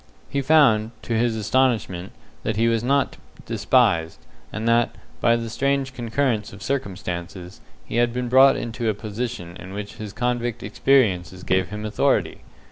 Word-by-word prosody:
He 140 Hz, -, 0 dB
found, 135 Hz, -7 st, +4 dB
to 120 Hz, -, -3 dB
his 115 Hz, 0 st, +1 dB
astonishment, 110 Hz, -5 st, 0 dB, 0.3 s
that 110 Hz, -, -2 dB
he 115 Hz, +2 st, +2 dB
was 115 Hz, -1 st, +1 dB
not 140 Hz, +2 st, +1 dB, 0.3 s
despised, 80 Hz, -1 st, +2 dB, 0.3 s
and 110 Hz, +1 st, -4 dB
that, 115 Hz, 0 st, +2 dB, 0.2 s
by 115 Hz, -1 st, +4 dB
the 115 Hz, 0 st, -3 dB
strange 135 Hz, +3 st, -1 dB
concurrence 120 Hz, -2 st, -1 dB
of 95 Hz, 0 st, -11 dB
circumstances, 90 Hz, -7 st, -4 dB, 0.2 s
he -, -, -4 dB
had 120 Hz, 0 st, +3 dB
been 125 Hz, +1 st, -3 dB
brought 130 Hz, +2 st, +6 dB
into 115 Hz, 0 st, -3 dB
a 105 Hz, -, 0 dB
position 105 Hz, -4 st, -5 dB
in 95 Hz, +1 st, -10 dB
which 105 Hz, 0 st, -7 dB
his 105 Hz, -2 st, -6 dB
convict 120 Hz, +1 st, -2 dB
experiences 95 Hz, -6 st, +1 dB
gave 95 Hz, -1 st, +1 dB
him 105 Hz, +1 st, -6 dB
authority. 105 Hz, 0 st, 0 dB
115 Hz, 155 wpm, -23 LUFS, 100-125 Hz, 0.3 s, brought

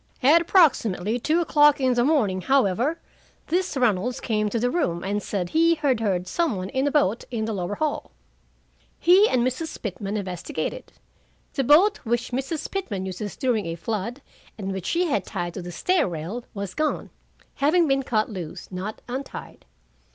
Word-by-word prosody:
"'At 310 Hz, +6 st, +6 dB
approximately 240 Hz, -, +3 dB
two 320 Hz, +7 st, +1 dB
o'clock 295 Hz, -3 st, +4 dB
in 260 Hz, -2 st, +2 dB
the 240 Hz, 0 st, +2 dB
morning, 230 Hz, -11 st, +2 dB
however, 265 Hz, -, +2 dB, 0.5 s
this 355 Hz, -2 st, 0 dB
Reynolds 245 Hz, 0 st, +1 dB
came 215 Hz, -2 st, 0 dB
to 230 Hz, -, -1 dB
the 245 Hz, +2 st, +1 dB
room, 175 Hz, -, -1 dB
and 205 Hz, +2 st, -1 dB
said 185 Hz, -4 st, -3 dB
he 330 Hz, +1 st, +4 dB
had 280 Hz, -6 st, +1 dB
heard 185 Hz, -5 st, -1 dB
some 330 Hz, -, 0 dB
one 185 Hz, 0 st, -4 dB
in 265 Hz, +2 st, 0 dB
a -, -, +1 dB
boat 240 Hz, -7 st, +2 dB
in 230 Hz, -3 st, -2 dB
the 220 Hz, -, -2 dB
lower 190 Hz, 0 st, -3 dB
hall. 305 Hz, +3 st, -2 dB, 0.9 s
He 380 Hz, +5 st, +5 dB
and 245 Hz, -1 st, +2 dB
Mrs. 260 Hz, +5 st, -3 dB
Pitman 205 Hz, 0 st, -4 dB
investigated. 180 Hz, -5 st, -4 dB, 0.6 s
The 275 Hz, -, 0 dB
boat 355 Hz, -, +5 dB
which 240 Hz, 0 st, -1 dB
Mrs. 270 Hz, +5 st, -3 dB
Pitman 215 Hz, -, -3 dB
uses 190 Hz, +2 st, -5 dB
during 240 Hz, -8 st, 0 dB
a 165 Hz, -, -3 dB
flood, 225 Hz, +8 st, -4 dB, 0.3 s
and 195 Hz, -2 st, -4 dB
which 190 Hz, -2 st, -5 dB
she 350 Hz, +1 st, +1 dB
had 230 Hz, -, 0 dB
tied 175 Hz, -1 st, -4 dB
to 185 Hz, -, -6 dB
the 175 Hz, 0 st, -7 dB
stair 360 Hz, -, +1 dB
rail, 175 Hz, +9 st, -5 dB
was 200 Hz, -2 st, -4 dB
gone, 305 Hz, 0 st, -2 dB, 0.5 s
having 320 Hz, +4 st, +3 dB
been 270 Hz, -1 st, +2 dB
cut 215 Hz, -4 st, 0 dB
loose, 180 Hz, -6 st, -7 dB
not 190 Hz, +4 st, -6 dB
untied. 260 Hz, +3 st, -7 dB
240 Hz, 175 wpm, -24 LUFS, 195-295 Hz, 0.9 s, At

